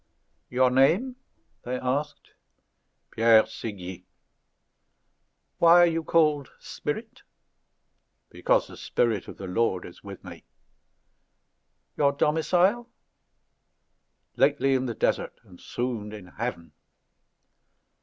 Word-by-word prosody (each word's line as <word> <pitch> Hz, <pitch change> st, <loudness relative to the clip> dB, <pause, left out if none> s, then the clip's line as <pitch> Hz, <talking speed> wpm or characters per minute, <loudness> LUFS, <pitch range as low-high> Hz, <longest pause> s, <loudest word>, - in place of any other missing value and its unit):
"Your 125 Hz, 0 st, +2 dB
name?" 180 Hz, -, +2 dB, 0.4 s
they 125 Hz, +1 st, -4 dB
asked. 145 Hz, +4 st, -3 dB, 0.8 s
"Pierre 115 Hz, -1 st, +5 dB
Séguier." 95 Hz, -5 st, -8 dB, 1.6 s
"Why 170 Hz, +1 st, +7 dB
are -, -, +7 dB
you 165 Hz, -1 st, -1 dB
called 150 Hz, -4 st, +2 dB
Spirit?" -, -, -6 dB, 1.1 s
"Because -, -, +1 dB
the -, -, -13 dB
Spirit 115 Hz, -5 st, -1 dB
of -, -, -10 dB
the 95 Hz, -, -7 dB
Lord 95 Hz, -1 st, -1 dB
is 85 Hz, -, -13 dB
with 100 Hz, -1 st, -10 dB
me." -, -, -11 dB, 1.5 s
"Your 140 Hz, -1 st, +3 dB
domicile?" 180 Hz, +11 st, +1 dB, 1.5 s
"Lately 140 Hz, -1 st, +3 dB
in 130 Hz, 0 st, 0 dB
the 115 Hz, -, -4 dB
desert, -, -, -1 dB
and 90 Hz, -2 st, -17 dB
soon 120 Hz, -4 st, -4 dB
in 105 Hz, -3 st, -9 dB
heaven." 90 Hz, -3 st, -6 dB
125 Hz, 100 wpm, -26 LUFS, 110-150 Hz, 1.6 s, Why